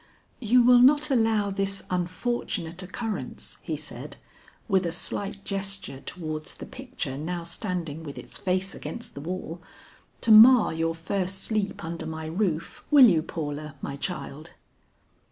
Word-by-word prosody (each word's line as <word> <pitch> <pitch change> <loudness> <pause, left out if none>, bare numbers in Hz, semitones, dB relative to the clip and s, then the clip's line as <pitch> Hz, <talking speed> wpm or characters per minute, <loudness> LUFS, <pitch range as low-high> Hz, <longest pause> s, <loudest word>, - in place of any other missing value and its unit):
"You 245 +1 +4
will 245 0 +7
not 290 +4 +5
allow 225 -5 +2
this 195 0 -2
unfortunate 180 -1 -2
occurrence," 210 +4 -5
he - - -3
said, - - -9 0.5
with 190 -5 +2
a - - -2
slight 200 +3 -4
gesture 195 -8 -3
towards 155 -1 -6
the - - -8
picture 245 - -5
now 170 +2 -3
standing 170 -3 -4
with 145 -3 -8
its - - -10
face 185 0 -1
against 235 - -7
the 140 - -7
wall, 175 +1 -5 0.6
"to 225 - +3
mar 230 0 +9
your 165 0 -1
first 185 +3 -2
sleep 215 -5 -1
under 165 0 -4
my 160 0 -5
roof, 170 -1 -2
will 285 -4 +9
you 170 -9 +5
Paula, 150 -2 -5
my 140 - -3
child?" 155 -1 -5
185 Hz, 145 wpm, -27 LUFS, 165-215 Hz, 0.6 s, mar